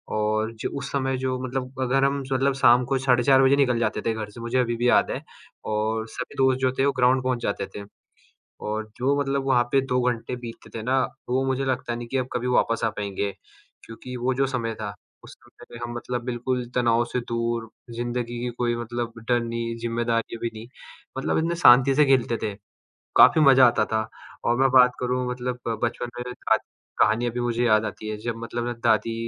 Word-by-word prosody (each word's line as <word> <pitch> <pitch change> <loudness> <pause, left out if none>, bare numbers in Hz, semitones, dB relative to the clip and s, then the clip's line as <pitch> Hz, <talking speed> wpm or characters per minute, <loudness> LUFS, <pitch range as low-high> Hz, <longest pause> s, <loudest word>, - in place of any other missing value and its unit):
और 110 +1 0
जो - - -2
उस 140 0 -6
समय 135 -1 0
जो 130 0 -1
मतलब 130 0 -4
अगर 135 +1 +2
हम 140 0 0
स 135 - -12
मतलब 135 +1 +2
शाम 125 -2 +5
को 135 +1 0
साढ़े 125 -2 +2
4 135 +1 +5
बजे 135 +1 +5
निकल 125 -4 +2
जाते 110 -2 -1
थे 115 - +1
घर 110 -1 -5
से 115 - -11
मुझे 120 +2 -1
अभी 120 -1 0
भी 120 +1 +2
याद - - +3
है, - - -4 0.4
और 110 +1 -1
सभी 125 +3 -7
दोस्त 130 -1 +3
जो 130 -1 +2
थे 135 - +4
वो 140 - +3
ग्राउंड 130 +1 +3
पहुँच 130 -1 0
जाते 100 -1 -2
थे। 100 - -6 0.8
और 110 +1 -3
जो 135 +3 +1
मतलब 140 -1 -1
वहाँ 125 -3 +3
पे 135 - +5
2 125 -1 +1
घंटे 120 +1 -4
बीतते 120 -2 -10
थे - - -5
ना, 130 +3 +2 0.3
वो 130 +2 +1
मुझे 135 +1 0
लगता 130 -2 -2
नहीं 120 0 -7
कि 135 - -2
अब 130 0 -2
कभी 125 0 -2
वापस 115 -2 +1
आ - - +3
पाएँगे, 100 -1 -3 0.5
क्योंकि 125 +3 -9
वो 125 +2 0
जो 135 +1 +1
समय 120 -4 -2
था, 105 -3 -6 0.3
उस - - -12
समय - - -18
में - - -8
हम 120 0 -5
मतलब 120 0 -4
बिल्कुल 125 0 -2
तनाव 120 -1 +2
से 125 - 0
दूर, 115 -1 -2 0.2
ज़िंदगी 120 0 -3
की 125 - -2
कोई 120 -1 0
मतलब 120 0 -4 0.2
डर 120 -1 +3
नहीं, 115 0 -3
ज़िम्मेदारी 115 0 -1
भी 115 - -3
नहीं, 110 +1 -9 0.5
मतलब 135 - 0
इतने 165 +2 0
शांति 135 -4 +6
से 150 +2 +5
खेलते 130 -3 +2
थे, 105 -2 -2 0.6
काफ़ी 160 - +7
मज़ा 135 -3 +7
आता 120 - +2
था। 110 0 -1 0.4
और 120 - +2
मैं 135 0 +4
बात 125 -1 +7
करूँ 125 0 -1
मतलब 125 0 -4 0.2
बचपन 120 +1 -2
मेरे 125 0 -5 0.2
दा - - +7 0.4
कहानियाँ 115 +3 +3
भी 120 - -3
मुझे 120 0 0
याद 110 -1 +3
आती 110 +1 -6
हैं 105 - -4
जब 120 -1 -2
मतलब 115 +1 -4
ना 120 - -2
दादी 115 0 +2
120 Hz, 215 wpm, -24 LUFS, 115-130 Hz, 0.8 s, काफ़ी